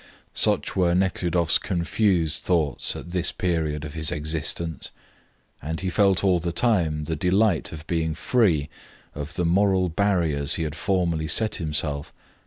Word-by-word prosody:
Such - - +2
were 90 -2 +2
Nekhludoff's 90 -3 +1
confused 85 -3 0
thoughts 80 -7 0
at 85 - -8
this 90 -1 -1
period 80 -4 -2
of 75 - -8
his 80 -2 0
existence, 80 +2 -2 0.7
and 80 +2 -4
he 95 -1 -2
felt 100 -1 +3
all 95 -3 +3
the 85 +1 -3
time 85 -7 +1
the 80 +2 -3
delight 90 +3 +1
of 80 0 -9
being 80 -2 -1
free 85 - +1 0.5
of 75 +3 -7
the 90 - -1
moral 95 +1 +2
barriers 85 -6 +1
he 85 - -2
had 75 -2 -3
formerly 85 -3 -1
set 110 +8 +2
himself. 75 -1 -2
85 Hz, 150 wpm, -24 LUFS, 80-95 Hz, 0.7 s, felt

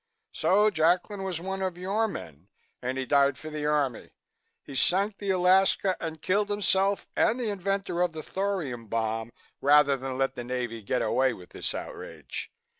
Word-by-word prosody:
So 210 +3 +3
Jacklin 180 +5 +1
was 190 -4 -2
one 190 +2 -4
of 185 -2 -2
your 200 +5 0
men 80 - -8 0.3
and 130 +1 -2
he 130 - -2
died 140 -1 +3
for 155 +2 -8
the 150 -1 -2
Army. 145 -5 0 0.5
He 140 - -10
sank 195 +9 +2
the 200 - -4
Alaska 190 +1 +4
and 160 -2 -6
killed 205 +2 +1
himself 200 -1 +2
and 240 - +2
the 230 -4 -1
inventor 195 -2 -1
of 180 -1 +2
the 155 -1 -6
thorium 170 - -3
bomb, 115 +1 -2 0.3
rather 145 0 +5
than 130 -1 -5
let 135 0 +1
the 120 - -6
Navy 120 -2 -3
get 120 +4 -1
away 130 +3 +2
with 90 -5 -13
this - - -3
outrage. - - -7
160 Hz, 175 wpm, -28 LUFS, 130-195 Hz, 0.5 s, rather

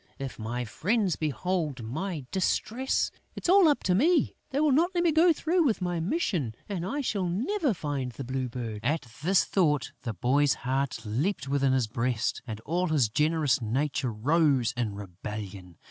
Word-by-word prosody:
If 135 -3 -6
my 120 +3 -3
friends 200 - 0
behold 155 -3 -2
my 155 - -4
distress, 230 +7 0 0.2
it - - -8
is - - +1
all 380 -2 +7
up 290 -9 +2
with 180 - +3
me: 315 - +3
they 275 -1 -1
will 300 -1 +3
not 325 +6 +4
let 345 - +2
me 340 - +4
go 330 +3 +5
through 335 +2 +1
with 250 -8 +1
my 175 -2 -1
mission 170 - -1
and 190 -5 -3
I 285 +11 -2
shall 200 -8 -1
never 265 - 0
find 140 -5 -3
the 135 - -7
Blue 130 0 -3
Bird!" 115 -3 -5
At 145 +4 0 0.2
this 185 +5 +3
thought, 150 -8 +1
the 115 -5 -4
boy's 135 +8 +2
heart 130 -3 -1
leaped 140 - -1
within 135 -1 +2
his 130 -3 +2
breast 115 +1 -1
and 110 -2 -5
all 175 +8 -1
his 145 -9 +2
generous 150 +2 +2
nature 130 +3 -1
rose 135 +1 +2
in 115 -5 -2
rebellion. 100 -2 -8
145 Hz, 180 wpm, -28 LUFS, 120-195 Hz, 0.2 s, all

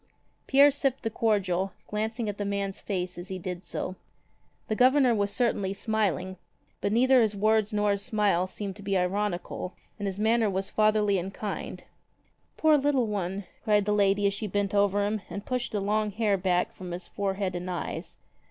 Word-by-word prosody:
Pierre 280 +1 +7
sipped 275 -2 -1
the 225 - -1
cordial, 195 -4 0
glancing 220 +2 -2
at 205 0 -4
the - - 0
man's 200 -1 -2
face 180 -3 -3
as 175 - -8
he 190 - -4
did 180 0 -5
so. 185 - -4 0.7
The 215 - -1
Governor 255 +1 +5
was 205 -2 +1
certainly 205 -5 0
smiling, 195 -3 -1 0.4
but 200 - 0
neither 255 +3 +5
his 215 -2 +1
words 215 +1 +2
nor 210 -1 +2
his 200 0 -1
smile 200 -4 +1
seemed 195 0 -5
to - - -11
be 195 -1 0
ironical, 185 -1 -2 0.2
and 205 - -2
his 195 -1 -3
manner 220 +1 +2
was 190 0 -2
fatherly 215 -2 +3
and 185 +2 -5
kind. 205 +1 -5 0.7
"Poor 310 -2 +5
little 275 -3 +2
one!" 200 -2 -3 0.2
cried 210 -2 +3
the 210 - +1
lady 200 0 +3
as 200 - +3
she 215 +1 -4
bent 200 0 -1
over 200 0 +3
him 210 0 -1
and 200 - -6
pushed 250 -1 -2
the 210 - -1
long 210 +2 0
hair 210 0 +1
back 180 -2 0
from 185 -1 -8
his 175 +1 -5
forehead 195 -2 -2
and 180 +1 -4
eyes. 175 -2 -5
205 Hz, 190 wpm, -28 LUFS, 190-220 Hz, 0.7 s, Pierre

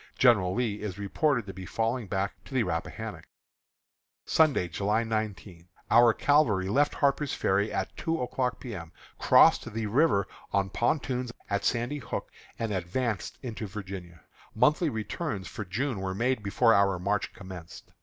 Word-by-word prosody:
General 105 -8 +4
Lee 115 -4 -1
is 100 -3 -4
reported 120 +5 0
to 95 - -7
be 95 0 -8
falling 115 +2 -1
back 95 +1 -3
to 135 - -9
the 125 - +3
Rappahannock. 80 -5 -4 1.0
Sunday, 150 - +3
July 105 +6 0
19. 105 -6 -4 0.2
Our 120 0 +7
cavalry 110 -11 +3
left 145 +7 +2
Harper's 140 0 +1
Ferry 100 +2 +1
at - - -3
two 165 0 -1
o'clock 125 0 -1
P. 125 -3 -7
M., 85 -4 -7 0.3
crossed 120 - +5
the 110 0 -3
river 110 -2 +3 0.2
on 100 -1 0
pontoons 125 -1 0 0.2
at 100 0 0
Sandy 120 +5 0
Hook, 125 - -5 0.3
and 115 -2 -2
advanced 100 +4 -2
into 115 -3 -5
Virginia. 95 -5 -8 0.3
Monthly 150 +7 +3
returns 110 - -4
for 105 - -6
June 110 +4 -2
were 95 -1 -3
made 125 +2 0
before 115 +3 +3
our 100 -2 +3
march 100 +3 -1
commenced. 90 -4 -10
110 Hz, 155 wpm, -28 LUFS, 95-125 Hz, 1.0 s, Our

